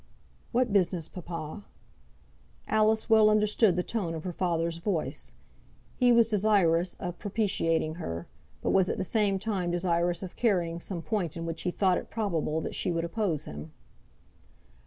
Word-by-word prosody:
"What 245 -3 +1
business, 180 -4 +1
papa?" 170 +1 -7 1.0
Alice 220 0 +2
well 220 -1 +6
understood 210 -2 +3
the 180 - 0
tone 180 -7 -2
of 160 - -6
her 180 - -4
father's 170 -2 -1
voice. 170 -1 -3 0.6
He 250 -1 +4
was 235 -2 +5
desirous 195 -5 +2
of 175 -2 -6
propitiating 185 -7 0
her; 85 - -4 0.4
but - - +1
was 190 -2 +3
at - - -1
the - - -1
same 205 0 +1
time 190 -3 -2
desirous 175 0 0
of 185 - -7
carrying 175 -7 +1
some 170 -1 -5
point 180 -7 -2
in 165 - -4
which 165 -1 -4
he 180 - -1
thought 185 0 +2
it - - -11
probable 165 -8 -1
that - - -4
she - - -1
would 165 0 -1
oppose 175 -4 -1
him. 75 +2 -8
180 Hz, 160 wpm, -29 LUFS, 165-210 Hz, 1.0 s, well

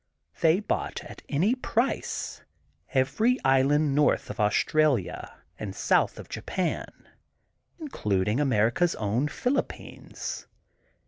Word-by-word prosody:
They 165 +2 +4
bought 210 - -3
at - - -11
any 175 +11 +2
price 255 0 -2 0.5
every 215 - +2
island 135 +2 +3
north 150 +1 +2
of - - -10
Australia 125 - +1 0.2
and 100 -3 -5
south - - +2
of - - -9
Japan, 180 -3 -4 0.7
including 105 - -1
America 125 +3 +3
's 170 - -4
own 110 +7 0
Philippines. 250 - -4
145 Hz, 105 wpm, -27 LUFS, 115-185 Hz, 0.7 s, They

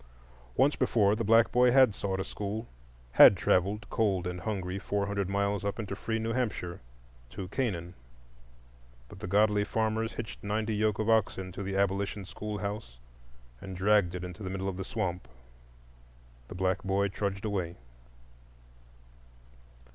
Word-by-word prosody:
Once 140 +4 +4
before, 105 -5 +3
the 115 - -2
black 115 +2 +5
boy 125 +1 +5
had 130 -3 +6
sought 95 -1 -3
a - - 0
school, 105 +4 -5 0.4
had 95 - +9
travelled, 100 +4 +1
cold 100 -5 +1
and 90 0 -4
hungry, 95 -3 -3
four 100 0 -1
hundred 100 -2 -2
miles 100 0 0
up 100 0 -2
into 100 -3 -4
free 110 +3 -2
New 115 +1 -2
Hampshire, 105 -8 -2 0.5
to 90 +10 -6
Canaan. 95 -8 -2 1.2
But - - -12
the - - -6
godly 105 +2 +3
farmers 110 +1 -1
hitched 115 -2 -7
ninety 105 +1 -1
yoke 105 0 +1
of 110 - -1
oxen 100 -4 +1
to 95 - -7
the 95 0 -3
abolition 100 0 0
schoolhouse 100 - -5 0.6
and 95 -1 -7
dragged 95 -2 +3
it 90 - -5
into 90 +3 -8
the 95 - -4
middle 95 0 -3
of 95 -2 -3
the 95 - -3
swamp. 95 - -3 1.2
The - - -9
black 95 +1 0
boy 100 +1 +1
trudged 100 +1 -3
away. 90 -5 -2
100 Hz, 155 wpm, -30 LUFS, 95-110 Hz, 1.2 s, had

